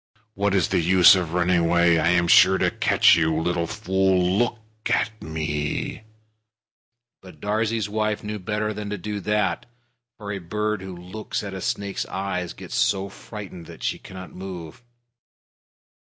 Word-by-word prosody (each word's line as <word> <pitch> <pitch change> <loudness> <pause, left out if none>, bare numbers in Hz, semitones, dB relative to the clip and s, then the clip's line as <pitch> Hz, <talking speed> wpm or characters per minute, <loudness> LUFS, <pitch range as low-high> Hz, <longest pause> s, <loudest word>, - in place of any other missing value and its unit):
What 100 -1 0
is 95 -4 +2
the - - +2
use 90 +1 +7
of 85 -3 -2
running 90 0 +2
away? 85 0 +3
I 80 - +2
am 85 -1 +3
sure 95 +2 +7
to - - +1
catch - - +4
you. 80 -1 +1
Little 85 0 -1
fool, 95 -3 +1
look 120 -1 +1 0.3
at - - +1
me!" 80 +5 -3 1.2
Darzee's 105 +5 -2
wife 110 0 -1
knew 105 0 -4
better 105 +3 -2
than 105 -1 -6
to 105 - -3
do 105 +3 -4
that, 105 -2 -1 0.5
for 100 -1 -6
a 100 - -3
bird 105 +3 -2
who 95 -1 -7
looks 95 +5 -5
at 100 -1 -6
a 95 - -6
snake's 100 -5 -3
eyes 90 -2 -3
gets - - -10
so 100 0 +1
frightened 95 -4 -9
that - - -11
she - - -1
cannot 95 -1 -10
move. 90 0 -8
95 Hz, 155 wpm, -24 LUFS, 85-105 Hz, 1.2 s, use